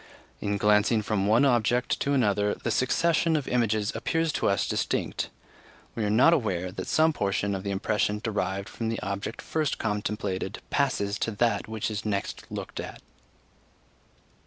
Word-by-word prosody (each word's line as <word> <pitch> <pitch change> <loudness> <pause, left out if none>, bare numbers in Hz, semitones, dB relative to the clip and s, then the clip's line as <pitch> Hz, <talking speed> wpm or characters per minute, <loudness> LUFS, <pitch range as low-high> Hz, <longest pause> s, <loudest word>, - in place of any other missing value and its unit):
In 100 0 -1
glancing 105 +2 +3
from 100 -2 0
one 115 +6 +5
object 120 -1 +2
to 140 - 0
another, 105 -5 +2
the - - -3
succession 165 +5 +2
of 145 -3 -1
images 110 -3 +1
appears 165 -1 0
to - - +1
us 100 - +1
distinct; - - -1 0.6
we 115 - -2
are 105 - +1
not 125 +10 +6
aware 95 - 0
that 95 - -6
some 160 0 +3
portion 100 -3 0
of 95 - -3
the 100 - -4
impression 105 +1 0
derived 100 -3 -2
from 115 -1 -4
the 115 - -2
object 100 +3 -4
first 155 -3 -1
contemplated 105 -2 -2
passes 105 -8 0
to - - 0
that 115 0 +1
which 110 0 -3
is 105 0 -3
next 100 -2 -3
looked - - -6
at. - - -6
105 Hz, 160 wpm, -27 LUFS, 100-125 Hz, 0.6 s, not